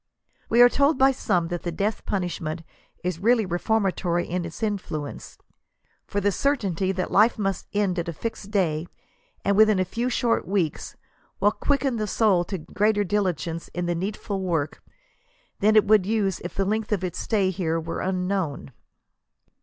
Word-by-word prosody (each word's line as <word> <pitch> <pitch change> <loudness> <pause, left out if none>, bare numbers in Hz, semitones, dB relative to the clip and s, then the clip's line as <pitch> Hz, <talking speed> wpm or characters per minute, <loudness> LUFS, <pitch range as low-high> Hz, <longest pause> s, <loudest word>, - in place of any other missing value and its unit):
We 235 +2 +7
are - - +10
told 280 +3 +2
by 270 +1 +5
some 180 -10 0
that 175 -1 -3
the 175 - -3
death 205 +6 -2
punishment 170 -4 -3 0.4
is 180 -2 -2
really 225 +2 +3
reformatory 180 -2 0
in 175 0 -2
its 170 +7 -7
infllience; 180 -9 -4 0.7
for 200 - -1
the 205 0 +2
certainty 195 - 0
that 185 -1 -3
life 220 +5 +4
must 195 -3 -2
end 200 -3 0
at 170 - -3
a 170 - -3
fixed 210 +2 -5
day, 175 -6 0 0.6
and 200 - +3
within 215 -1 +5
a 185 - +1
few 235 +7 -2
short 240 -2 0
weeks, 185 -5 -1 0.4
will 205 +2 +4
quicken 270 +3 0
the 215 -1 -2
soul 200 -4 +3
to 190 - -4
greater 205 +5 +1
diligence 175 -4 -1
in 175 0 -1
the 175 - 0
needful 195 +2 -3
work, 165 -5 -2 0.8
than 215 +2 +4
it 215 - +6
would 210 -3 +4
use 205 -4 0
if 175 - -7
the 195 - +1
length 215 +2 -1
of 200 -3 0
its 180 -2 -3
stay 200 -4 +1
here 165 -3 -1
were 165 +1 -4
unknown. 185 -7 -2
195 Hz, 170 wpm, -25 LUFS, 175-215 Hz, 0.8 s, are